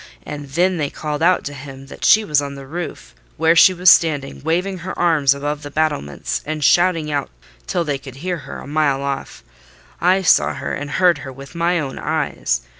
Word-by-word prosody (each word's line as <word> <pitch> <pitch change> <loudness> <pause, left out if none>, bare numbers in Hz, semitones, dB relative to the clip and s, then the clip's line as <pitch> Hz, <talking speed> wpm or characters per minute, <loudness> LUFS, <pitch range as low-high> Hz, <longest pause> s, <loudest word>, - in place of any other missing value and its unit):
And 145 -1 -7
then 175 +5 +1
they 145 -3 -1
called 150 +1 -5
out 180 +2 +3
to 145 - -5
him 135 0 -10
that 135 - -12
she 215 0 +5
was 150 -6 +2
on 140 -1 -6
the 135 -1 -9
roof, 170 +5 -7 0.2
where 160 +2 +3
she 185 - +8
was 180 0 +6
standing, 145 -4 +2
waving 180 +5 -1
her 180 +2 -6
arms, 150 -5 +3
above 145 +1 -3
the 145 - -7
battlements, 145 - -2
and 155 0 -4
shouting 165 +1 +3
out 145 -2 -2 0.4
till 175 - 0
they 145 -4 -2
could 135 -2 -11
hear 175 +5 -3
her 145 - -9
a - - -9
mile 145 -2 0
off: 140 -1 -5 0.6
I 185 +3 +3
saw 75 - +4
her 70 - -4
and 145 +1 -4
heard 175 0 +3
her 135 - -8
with 135 +2 -12
my 170 +1 +1
own 135 -3 -5
eyes. 145 - -1
150 Hz, 205 wpm, -19 LUFS, 140-170 Hz, 0.6 s, she